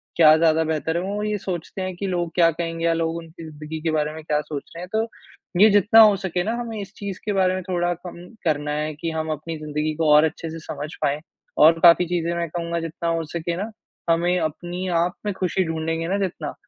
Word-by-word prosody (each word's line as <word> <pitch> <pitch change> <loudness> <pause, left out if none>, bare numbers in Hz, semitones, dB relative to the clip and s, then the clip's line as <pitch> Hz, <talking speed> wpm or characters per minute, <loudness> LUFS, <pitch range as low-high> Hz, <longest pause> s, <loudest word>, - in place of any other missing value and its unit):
क्या 155 -2 +7
ज़्यादा 160 0 +3
बेहतर 160 +1 -1
है। - - 0
वो 205 +2 -3
ये 210 0 -1
सोचते 185 -1 -5
हैं 185 -1 -3
कि 195 +3 -4
लोग 175 -2 -1
क्या 170 -2 +5
कहेंगे 165 0 -3
या 165 - +3
लोग 165 0 -1
उनकी 165 0 -10
ज़िंदगी 155 0 -7
के 160 0 0
बारे 150 -1 0
में 160 0 -9
क्या 150 -1 0
सोच 150 -1 -7
रहे 170 - -6
हैं। - - -7
तो, 220 +1 +1 0.5
ये 215 - +9
जितना 205 +2 +5
हो 210 -2 +7
सके 185 -2 -2
ना, 220 - -1
हमें 230 -2 -5
इस 195 0 -9
चीज़ 200 -2 -5
के 210 - 0
बारे 185 -1 +3
में 185 - -2
थोड़ा 175 -1 0
कम 175 0 -10 0.2
करना 150 -2 0
है 150 +1 -2
कि 165 +3 -4
हम 160 0 -3
अपनी 155 +2 -5
ज़िंदगी 150 0 -2
को 160 0 +1
और 150 +1 +7
अच्छे 160 +1 -2
से 165 +1 -7
समझ 150 -1 -6
पाएँ 145 +1 +1 0.5
और 165 +1 +6
काफ़ी 175 +1 +7
चीज़ें 170 -1 -1
मैं 170 0 -1
कहूँगा 170 +1 -3
जितना 165 +1 -3
हो 165 0 0
सके 170 0 -2
ना, 205 +4 -3 0.4
हमें 175 +2 +2
अपनी 175 +3 -3 0.2
आप 180 +1 -2
में 205 - 0
खुशी 185 +1 +1
ढूँढ़ेंगे 165 0 -2
ना 195 +3 0
जितना, 170 -6 -3
170 Hz, 235 wpm, -23 LUFS, 160-185 Hz, 0.5 s, ये